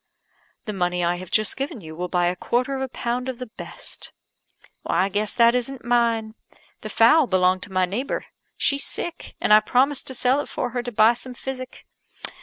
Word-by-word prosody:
"The 210 Hz, -, -4 dB
money 180 Hz, -2 st, 0 dB
I 175 Hz, +1 st, +1 dB
have 185 Hz, 0 st, -9 dB
just 215 Hz, +1 st, +1 dB
given 270 Hz, -3 st, -4 dB
you 160 Hz, -4 st, -10 dB
will 180 Hz, +2 st, -3 dB
buy 175 Hz, 0 st, +1 dB
a 175 Hz, +1 st, +1 dB
quarter 250 Hz, +8 st, 0 dB
of 265 Hz, -, -3 dB
a 265 Hz, -, -1 dB
pound 245 Hz, +1 st, -3 dB
of 255 Hz, -, -4 dB
the 250 Hz, -, -5 dB
best." 220 Hz, -, -8 dB, 0.7 s
"I 190 Hz, +2 st, +1 dB
guess 205 Hz, +2 st, 0 dB
that 235 Hz, -1 st, +6 dB
isn't 250 Hz, +1 st, -2 dB
mine. 230 Hz, -2 st, +1 dB, 0.5 s
The 215 Hz, -, -7 dB
fowl 250 Hz, +7 st, +5 dB
belonged 185 Hz, -1 st, +3 dB
to 200 Hz, -, -8 dB
my 185 Hz, -1 st, +2 dB
neighbour. 220 Hz, +10 st, -3 dB, 0.3 s
She's 280 Hz, 0 st, +1 dB
sick; 345 Hz, -1 st, -5 dB
and -, -, +3 dB
I 215 Hz, -, +10 dB
promised 260 Hz, +6 st, +1 dB
to 260 Hz, -, -3 dB
sell 255 Hz, +3 st, +3 dB
it 290 Hz, -, -4 dB
for 245 Hz, -, -3 dB
her 245 Hz, +1 st, -1 dB
to 245 Hz, 0 st, -5 dB
buy 220 Hz, +1 st, +5 dB
some 250 Hz, +1 st, -8 dB
physic. 255 Hz, 0 st, -7 dB
235 Hz, 205 wpm, -23 LUFS, 190-255 Hz, 0.7 s, I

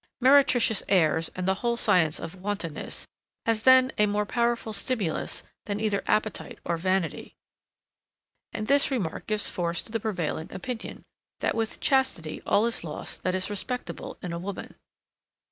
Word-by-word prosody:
Meretricious 255 Hz, -4 st, +5 dB
airs, 165 Hz, -4 st, +3 dB
and 185 Hz, 0 st, -3 dB
the 190 Hz, -, +4 dB
whole 235 Hz, -1 st, +1 dB
science 160 Hz, -8 st, +3 dB
of 165 Hz, 0 st, -6 dB
wantonness, 190 Hz, -4 st, -4 dB, 0.4 s
has 225 Hz, -1 st, +1 dB
then 260 Hz, +1 st, +6 dB
a 210 Hz, -, +5 dB
more 205 Hz, 0 st, 0 dB
powerful 235 Hz, 0 st, 0 dB
stimulus 200 Hz, -5 st, 0 dB, 0.2 s
than 205 Hz, 0 st, -2 dB
either 210 Hz, -2 st, 0 dB
appetite 215 Hz, 0 st, -1 dB
or 170 Hz, -, 0 dB
vanity; 185 Hz, 0 st, -1 dB, 1.2 s
and 215 Hz, -, -4 dB
this 280 Hz, +5 st, +5 dB
remark 215 Hz, -, -3 dB
gives 215 Hz, -1 st, +2 dB
force 170 Hz, -1 st, -1 dB
to -, -, -9 dB
the 225 Hz, -, -1 dB
prevailing 180 Hz, -7 st, -3 dB
opinion, 250 Hz, -4 st, -6 dB, 0.4 s
that -, -, +1 dB
with 225 Hz, -1 st, -2 dB
chastity 260 Hz, -, +1 dB
all 210 Hz, -, +4 dB
is 235 Hz, -6 st, +1 dB
lost 150 Hz, -3 st, -5 dB
that 185 Hz, 0 st, 0 dB
is 185 Hz, +2 st, -1 dB
respectable 250 Hz, +5 st, -4 dB
in 170 Hz, -2 st, -4 dB
woman. 195 Hz, +1 st, -6 dB
205 Hz, 150 wpm, -27 LUFS, 180-235 Hz, 1.2 s, then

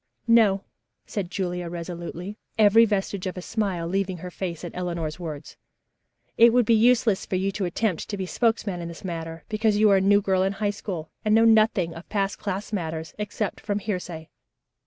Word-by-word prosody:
"No," 215 Hz, -4 st, +5 dB, 0.4 s
said 195 Hz, -4 st, -4 dB
Julia 180 Hz, -2 st, -3 dB
resolutely, 175 Hz, +2 st, -6 dB, 0.2 s
every 220 Hz, +1 st, +7 dB
vestige 200 Hz, -2 st, -2 dB
of 185 Hz, -, -5 dB
a -, -, -4 dB
smile 190 Hz, -7 st, -2 dB
leaving 190 Hz, 0 st, -1 dB
her 180 Hz, +2 st, -8 dB
face 175 Hz, -2 st, -5 dB
at 175 Hz, -, -6 dB
Eleanor's 170 Hz, -3 st, -3 dB
words. 155 Hz, -4 st, -7 dB, 0.8 s
"It 235 Hz, +1 st, +8 dB
would 245 Hz, -1 st, +4 dB
be 230 Hz, -, +4 dB
useless 225 Hz, -2 st, +4 dB
for -, -, -3 dB
you 190 Hz, +2 st, 0 dB
to 195 Hz, 0 st, -2 dB
attempt 180 Hz, 0 st, -1 dB
to 205 Hz, -, -3 dB
be 190 Hz, -, -3 dB
spokesman 205 Hz, -3 st, 0 dB
in 170 Hz, -, -5 dB
this 170 Hz, +2 st, -9 dB
matter, 165 Hz, -2 st, -5 dB
because 215 Hz, -1 st, +1 dB
you 210 Hz, -1 st, +5 dB
are 195 Hz, -, +6 dB
a -, -, +2 dB
new 200 Hz, +1 st, +5 dB
girl 190 Hz, -2 st, +1 dB
in 190 Hz, +1 st, +1 dB
High 205 Hz, 0 st, -1 dB
School 180 Hz, -6 st, -6 dB
and 215 Hz, 0 st, +3 dB
know 225 Hz, +1 st, +5 dB
nothing 215 Hz, -6 st, +4 dB
of 165 Hz, +1 st, -11 dB
past 195 Hz, -2 st, -1 dB
class 200 Hz, +1 st, -4 dB
matters 160 Hz, -4 st, -3 dB
except 210 Hz, 0 st, -3 dB
from 205 Hz, -1 st, -1 dB
hearsay. 180 Hz, -6 st, -4 dB
195 Hz, 195 wpm, -25 LUFS, 175-210 Hz, 0.8 s, It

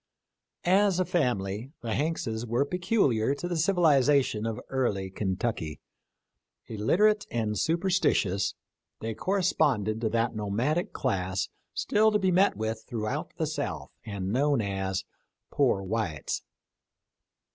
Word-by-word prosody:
As 190 Hz, +1 st, +4 dB
a 185 Hz, -, +2 dB
family 125 Hz, -, -1 dB
the 115 Hz, -2 st, -2 dB
Hankses 130 Hz, -7 st, -1 dB
were 120 Hz, +5 st, +1 dB
peculiar 145 Hz, -, +1 dB
to 175 Hz, -, -4 dB
the 175 Hz, -, -2 dB
civ 170 Hz, +5 st, +2 dB
ilization 140 Hz, -8 st, +3 dB
of 110 Hz, -2 st, -3 dB
early 100 Hz, -8 st, -1 dB
Kentucky. 95 Hz, -, -2 dB, 0.9 s
Illiterate 200 Hz, -, +2 dB
and 110 Hz, -3 st, -1 dB
super 170 Hz, -, +1 dB
stitious, 100 Hz, -, +1 dB, 0.4 s
they 110 Hz, 0 st, -3 dB
corresponded 140 Hz, -, +1 dB
to 110 Hz, -, +1 dB
that 115 Hz, +1 st, 0 dB
nomadic 115 Hz, -, 0 dB
class 95 Hz, -6 st, -1 dB, 0.3 s
still 220 Hz, +1 st, +3 dB
to 210 Hz, -, +3 dB
be 190 Hz, -2 st, +1 dB
met 185 Hz, -, +3 dB
with 110 Hz, +1 st, -3 dB
throughout 120 Hz, +6 st, -3 dB
the 160 Hz, -, 0 dB
South, 140 Hz, -, -4 dB
and 100 Hz, -3 st, -4 dB
known 140 Hz, +1 st, +2 dB
as 95 Hz, -2 st, -2 dB, 0.2 s
" -, -, -55 dB
poor 95 Hz, -, +2 dB
whites." 95 Hz, -7 st, -2 dB
120 Hz, 130 wpm, -28 LUFS, 105-165 Hz, 0.9 s, As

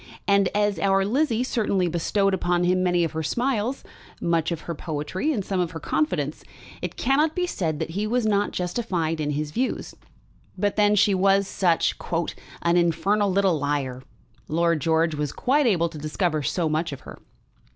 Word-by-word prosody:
And 200 Hz, -1 st, +4 dB
as 205 Hz, -1 st, +1 dB
our 195 Hz, -1 st, +2 dB
Lizzie 245 Hz, +1 st, +1 dB
certainly 210 Hz, -7 st, 0 dB
bestowed 195 Hz, +4 st, +1 dB
upon 175 Hz, -1 st, +1 dB
him 180 Hz, +1 st, +2 dB
many 175 Hz, -1 st, +2 dB
of 165 Hz, -, -1 dB
her 160 Hz, -, -3 dB
smiles, 240 Hz, -, -1 dB, 0.4 s
much 165 Hz, -1 st, 0 dB
of 165 Hz, -1 st, -3 dB
her 170 Hz, -, -5 dB
poetry, 160 Hz, -, -3 dB
and 210 Hz, -10 st, -2 dB
some 190 Hz, -2 st, -1 dB
of 175 Hz, -2 st, 0 dB
her 165 Hz, -, -5 dB
confidence, 150 Hz, -1 st, -1 dB, 0.4 s
it -, -, -4 dB
cannot 300 Hz, +5 st, +2 dB
be 360 Hz, -, +1 dB
said 165 Hz, -, -2 dB
that 165 Hz, -, -4 dB
he 205 Hz, +5 st, -2 dB
was 240 Hz, +1 st, 0 dB
not 205 Hz, -1 st, +2 dB
justified 175 Hz, -4 st, -2 dB
in 150 Hz, -, -1 dB
his 150 Hz, +1 st, -2 dB
views. 255 Hz, +10 st, -2 dB, 0.6 s
But 205 Hz, +2 st, 0 dB
then 210 Hz, 0 st, +4 dB
she 205 Hz, 0 st, +4 dB
was 195 Hz, +1 st, +3 dB
such 175 Hz, -5 st, +1 dB, 0.7 s
"an 170 Hz, +1 st, +3 dB
infernal 195 Hz, +4 st, +2 dB
little 190 Hz, -4 st, +2 dB
liar." 140 Hz, -3 st, -2 dB, 0.5 s
Lord 170 Hz, 0 st, +1 dB
George 160 Hz, +2 st, +2 dB
was 150 Hz, -1 st, -2 dB
quite 275 Hz, +2 st, +2 dB
able 170 Hz, -6 st, +2 dB
to 160 Hz, -2 st, -9 dB
discover 155 Hz, +1 st, -1 dB
so 165 Hz, +3 st, 0 dB
much 155 Hz, +1 st, -1 dB
of 140 Hz, -, -7 dB
her. -, -, -11 dB
180 Hz, 180 wpm, -24 LUFS, 160-205 Hz, 0.7 s, And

